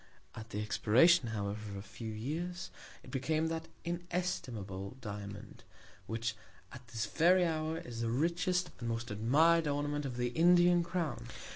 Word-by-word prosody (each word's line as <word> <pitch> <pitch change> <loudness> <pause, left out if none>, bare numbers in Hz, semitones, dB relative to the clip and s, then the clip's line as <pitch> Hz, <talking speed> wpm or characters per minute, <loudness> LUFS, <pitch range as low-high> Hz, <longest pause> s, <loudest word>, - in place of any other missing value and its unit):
At 110 +1 -9
the 105 -1 -3
Expiration, 125 - +5
however, 105 -1 -3
of 100 - -6
a 100 - -5
few 110 0 -7
Years, 160 +11 -4 0.3
it - - -12
became 155 +4 0
that 165 0 -3 0.2
inestimable 130 - -3
Diamond, 100 -2 -7 0.4
which 115 0 -2 0.4
at 125 -2 -11
this 115 -1 -2
very 175 - +4
Hour, 160 -1 -1
is 120 -6 -6
the 115 - 0
richest, 170 +7 +1
and 120 - -3
most 115 +1 -3
admir'd 150 +10 +4
Ornament 145 0 -1
of 125 -2 -6
the 120 0 0
Indian 175 +4 +5
Crown. 165 -9 -3
130 Hz, 150 wpm, -33 LUFS, 110-170 Hz, 0.4 s, Expiration